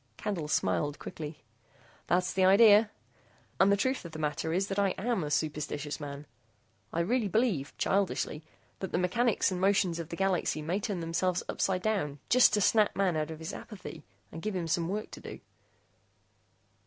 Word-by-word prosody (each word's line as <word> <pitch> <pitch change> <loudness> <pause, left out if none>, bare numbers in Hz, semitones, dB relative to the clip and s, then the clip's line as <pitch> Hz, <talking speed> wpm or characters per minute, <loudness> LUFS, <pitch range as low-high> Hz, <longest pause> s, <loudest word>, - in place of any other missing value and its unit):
Candle 180 -8 -3
smiled 140 - 0
quickly. 150 -2 -8 0.6
"That's 180 +1 +1
the 190 - +2
idea. 205 +2 +7 0.7
And 190 +1 +5
the 200 - +4
truth 260 +6 0
of 170 -2 -9
the - - -6
matter 155 +1 -2
is 185 +4 +1
that 195 0 -2
I 195 -2 +2
am 230 -3 -1
a 150 - -3
superstitious 150 0 -2
man. 145 0 -7 0.7
I 170 - 0
really 225 +5 +1
believe, 200 - 0
childishly, 190 -5 0 0.4
that 190 - -5
the - - 0
mechanics 205 +5 +1
and 185 -1 -3
motions 190 -3 +2
of 165 -1 -6
the 170 - -5
galaxy 185 -4 0
may 175 +6 -1
turn 195 -3 -3
themselves 175 +2 0
upsidedown 185 -6 -1
just 255 0 +6
to 210 - +1
snap 215 +1 +3
man 190 -4 +1
out 155 0 -1
of 160 - -6
his 160 +4 -6
apathy 185 -7 -9 0.3
and 165 - -7
give 215 +1 -3
him 175 -2 -2
some 165 +1 0
work 210 +2 -4
to - - -9
do." - - -9
180 Hz, 180 wpm, -30 LUFS, 155-200 Hz, 0.7 s, idea